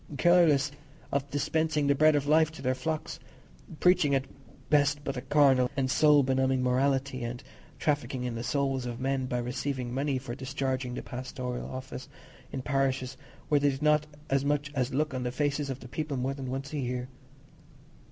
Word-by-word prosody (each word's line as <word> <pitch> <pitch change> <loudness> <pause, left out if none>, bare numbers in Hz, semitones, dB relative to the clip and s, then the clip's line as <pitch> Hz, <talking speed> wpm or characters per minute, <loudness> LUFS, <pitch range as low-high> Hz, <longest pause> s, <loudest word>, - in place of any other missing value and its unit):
—careless 155 -3 +4 0.4
of 140 0 -1
dispensing 155 +1 0
the 140 - +4
bread 155 +2 +5
of 145 -1 +1
life 155 +1 +4
to 155 -4 -11
their 130 0 +2
flocks, 155 +4 -3 0.6
preaching 180 -6 +4
at 135 0 0 0.5
best 145 0 +3
but 140 -1 -3
a 125 - -3
carnal 135 -2 +4
and 130 -1 +1
soul 150 -1 +5
benumbing 130 0 +1
morality, 130 0 +1
and 120 +2 -5 0.3
trafficking 145 -4 -1
in 125 -1 -2
the 115 - -4
souls 135 0 -1
of 120 0 -5
men 130 0 -1
by 125 - -1
receiving 125 +1 -3
money 135 +1 0
for 125 -2 -6
discharging 130 -1 -3
the - - -5
pastoral 125 -1 -5
office 130 0 -7 0.4
in 130 - -4
parishes 135 -2 0 0.3
where 150 - +3
they 145 0 +3
did 135 +1 -4
not 150 0 +3 0.3
so 135 - +2
much 145 0 0
as 130 -2 0
look 150 +2 0
on 130 - -2
the 125 0 -2
faces 145 +1 -1
of 135 0 -5
the 125 - -9
people 150 +2 -3
more 130 +2 -1
than 135 -2 -6
once 135 +3 -4
a 150 - -1
year. 125 -1 -3
135 Hz, 185 wpm, -29 LUFS, 130-145 Hz, 0.6 s, bread